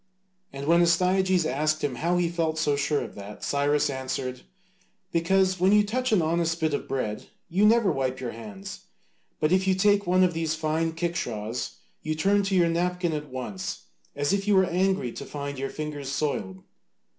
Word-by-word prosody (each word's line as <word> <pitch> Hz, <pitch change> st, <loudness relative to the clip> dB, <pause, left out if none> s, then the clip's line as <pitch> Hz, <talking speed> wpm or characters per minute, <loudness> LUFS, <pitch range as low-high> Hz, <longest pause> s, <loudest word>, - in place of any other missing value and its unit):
And 140 Hz, 0 st, -6 dB
when 170 Hz, +3 st, +5 dB
Astyages 180 Hz, +1 st, +3 dB
asked 155 Hz, +2 st, 0 dB
him 130 Hz, -4 st, -1 dB
how 170 Hz, +6 st, +1 dB
he 175 Hz, -1 st, +2 dB
felt 165 Hz, -2 st, -1 dB
so 150 Hz, -2 st, +2 dB
sure 145 Hz, +1 st, 0 dB
of -, -, -7 dB
that, 100 Hz, +1 st, -10 dB
Cyrus 145 Hz, +1 st, +1 dB
answered, 130 Hz, -1 st, -4 dB, 0.7 s
"Because 185 Hz, +2 st, +2 dB
when 185 Hz, +2 st, +4 dB
you 210 Hz, 0 st, +6 dB
touch 250 Hz, +4 st, -1 dB
an 195 Hz, -6 st, +4 dB
honest 165 Hz, +1 st, 0 dB
bit 160 Hz, -2 st, 0 dB
of -, -, -2 dB
bread 110 Hz, -6 st, -3 dB, 0.2 s
you 195 Hz, +5 st, +4 dB
never 225 Hz, -3 st, +4 dB
wipe 130 Hz, -3 st, -1 dB
your 125 Hz, -2 st, -4 dB
hands, 105 Hz, -4 st, -8 dB, 0.6 s
but 155 Hz, -, +1 dB
if 190 Hz, +1 st, +3 dB
you 190 Hz, -, +4 dB
take 200 Hz, 0 st, +3 dB
one 185 Hz, +1 st, +4 dB
of 180 Hz, -1 st, +2 dB
these 160 Hz, -1 st, -1 dB
fine 160 Hz, +1 st, -1 dB
kickshaws 125 Hz, -10 st, -3 dB, 0.3 s
you 155 Hz, 0 st, -2 dB
turn 200 Hz, +6 st, +3 dB
to 195 Hz, -1 st, 0 dB
your 175 Hz, -2 st, +4 dB
napkin 175 Hz, 0 st, 0 dB
at 150 Hz, -1 st, -4 dB
once, 180 Hz, +9 st, -5 dB, 0.3 s
as 145 Hz, +5 st, 0 dB
if 200 Hz, 0 st, -1 dB
you 205 Hz, -, +4 dB
were 190 Hz, 0 st, +5 dB
angry 185 Hz, -7 st, 0 dB
to -, -, -7 dB
find 140 Hz, -1 st, -6 dB
your 135 Hz, -, -2 dB
fingers 150 Hz, -3 st, -5 dB
soiled." 115 Hz, -11 st, -2 dB
160 Hz, 190 wpm, -26 LUFS, 140-185 Hz, 0.7 s, you